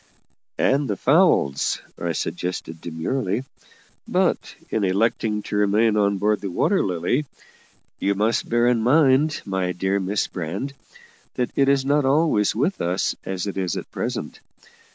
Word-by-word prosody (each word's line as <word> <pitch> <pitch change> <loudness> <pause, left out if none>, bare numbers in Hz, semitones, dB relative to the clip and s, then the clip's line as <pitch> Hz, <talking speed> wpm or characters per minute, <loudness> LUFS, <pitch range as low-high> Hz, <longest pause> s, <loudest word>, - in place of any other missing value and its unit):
"And 140 0 +2
the 100 - -1
fowls," 140 - +3 0.2
I - - -2
suggested 90 -2 -4
demurely. 95 +7 -2 0.6
"But, - - 0 0.2
in 110 - 0
electing 105 +2 0
to - - -5
remain 105 +2 +3
on 100 -1 +2
board 105 +1 +1
the 100 - -3
Water 165 - +1
Lily, 90 - 0 0.7
you 100 0 +1
must 110 +4 0
bear 120 0 +2
in 120 -2 +3
mind, 140 +3 +3
my 95 -2 -1
dear 95 +3 0
Miss 100 +2 0
Brand, 90 - -5 0.6
that 125 - -1
it 140 0 +3
is 140 -1 +2
not 145 +1 +2
always 135 -7 +2
with 145 - 0
us 90 +2 0
as 95 0 -3
it 100 -1 -3
is 90 -3 -1
at - - -7
present. - - -4
105 Hz, 150 wpm, -23 LUFS, 95-135 Hz, 0.7 s, fowls